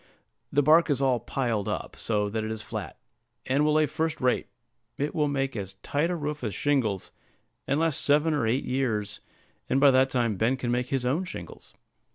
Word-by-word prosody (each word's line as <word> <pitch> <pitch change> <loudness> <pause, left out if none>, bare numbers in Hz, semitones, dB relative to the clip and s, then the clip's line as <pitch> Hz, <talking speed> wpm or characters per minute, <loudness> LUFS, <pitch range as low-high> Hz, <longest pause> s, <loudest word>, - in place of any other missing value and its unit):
The 145 - +3
bark 160 +4 +5
is 140 -3 +1
all 130 -3 +2
piled 115 -4 -2
up, - - -4
so 105 -2 -1
that 110 +2 -2
it 110 - -3
is 110 -1 -4
flat, 105 -8 -6 0.5
and 140 +3 +2
will 150 0 +3
lay 155 0 +4
first 160 +2 -2
rate; 125 -1 +1 0.5
it 145 +2 -2
will 150 -2 +1
make 135 -2 -1
as 95 -2 -5
tight 150 +4 0
a 180 - -1
roof 150 -3 -4
as 105 -5 -2
shingles, 125 -10 0 0.6
and 140 - +1
last 165 -3 +1
seven 150 +2 +3
or 140 -6 +1
eight 125 +5 0
years, 110 -6 -1 0.5
and 135 - +3
by 140 0 +7
that 130 +1 +4
time 120 -6 0
Ben 120 +6 +1
can 120 -2 -2
make 125 +1 0
his 135 -2 -1
own 145 +9 +1
shingles. 185 - -9
135 Hz, 205 wpm, -27 LUFS, 115-145 Hz, 0.6 s, by